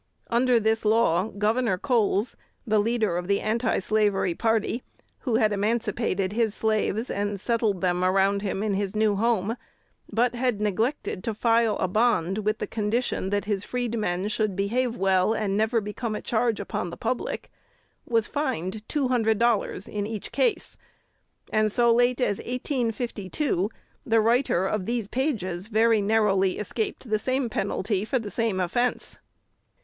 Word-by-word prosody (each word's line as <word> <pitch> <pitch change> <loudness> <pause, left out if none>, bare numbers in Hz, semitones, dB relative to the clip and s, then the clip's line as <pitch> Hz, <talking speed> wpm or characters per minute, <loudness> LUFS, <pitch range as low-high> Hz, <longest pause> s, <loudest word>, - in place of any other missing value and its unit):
Under 240 0 +4
this 220 0 +1
law 215 -3 +3
Gov. 215 -1 0
Coles, 225 -4 +1 0.3
the 215 -2 +2
leader 215 -4 +1
of 175 0 -4
the 200 0 +2
antislavery 215 -4 +1
party, 225 +3 0 0.4
who 245 -5 -1
had 215 -1 +3
emancipated 205 -2 0
his 225 -2 +1
slaves, 220 +1 0
and 205 0 -2
settled 220 -3 0
them 180 -1 +1
around 195 +2 +2
him 200 0 -2
in 215 -2 0
his 195 +1 -2
new 215 -1 +2
home, 225 -1 +1 0.6
but 235 +3 +2
had 245 -3 0
neglected 210 0 -1
to 225 -3 -2
file 230 -1 +2
a - - 0
bond 210 -2 +1
with 215 +1 0
the - - -3
condition 215 -1 -1
that 205 0 -1
his 205 -2 -1
freedmen 215 -7 -2
should 215 -2 -1
behave 235 +5 0
well 190 +2 +3
and 210 -3 -1
never 220 +3 +2
become 215 +2 -4
a - - -4
charge 230 -1 0
upon 195 -3 -3
the 170 - -8
public, 235 +2 -3 0.6
was 230 -2 +2
fined 220 - -2
two 280 -4 0
hundred 225 -3 +2
dollars 230 -4 +1
in 205 -1 -3
each 215 -2 -6
case; 480 -4 0 0.8
and, 215 0 +3
so 235 +2 +4
late 245 +1 +3
as 205 -6 +1
1852, 235 - -2 0.3
the 225 -1 +3
writer 225 -4 +2
of 190 -1 -2
these 235 -3 -1
pages 205 - -2
very 220 0 +3
narrowly 200 -3 +2
escaped 220 +4 -3
the 215 -1 +1
same 255 +2 0
penalty 200 0 -1
for 260 +5 0
the 215 -4 -5
same 225 -5 0
offence. 240 +8 -1
215 Hz, 155 wpm, -26 LUFS, 200-235 Hz, 0.8 s, Under